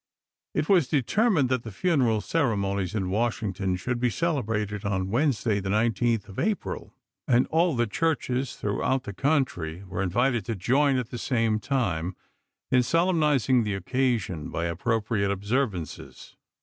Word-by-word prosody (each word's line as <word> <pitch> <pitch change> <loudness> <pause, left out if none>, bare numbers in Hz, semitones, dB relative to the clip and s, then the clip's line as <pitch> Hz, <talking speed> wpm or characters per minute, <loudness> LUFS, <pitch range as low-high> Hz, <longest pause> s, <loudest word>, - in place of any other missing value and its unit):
It 150 - 0
was 180 -9 +4
determined 155 - +2
that 130 -2 +1
the 115 - -8
funeral 125 - +1
ceremonies 100 - 0
in 95 -3 -1
Washington 105 -4 -1
should 120 +6 -3
be 125 0 +2
celebrated 110 - -1
on 95 -1 -1
Wednesday, 120 -5 +1
the 95 0 -4
19th 115 +1 +1
of 100 - -8
April, 215 -2 -2 0.3
and 125 0 +4
all 165 -1 +3
the 120 0 +2
churches 130 0 -1
throughout 125 +6 -1
the 100 - -6
country 100 - -1
were 95 0 -4
invited 120 +5 +1
to 115 - -2
join 135 +8 +2
at 125 -2 -3
the 120 - -5
same 115 -4 +1
time 95 - -1 0.6
"in 130 -1 +5
solemnizing 150 - +2
the 105 -2 -2
occasion" 100 - -1
by 85 - -2
appropriate 105 +4 0
observances. 100 - -3
115 Hz, 145 wpm, -26 LUFS, 100-135 Hz, 0.6 s, in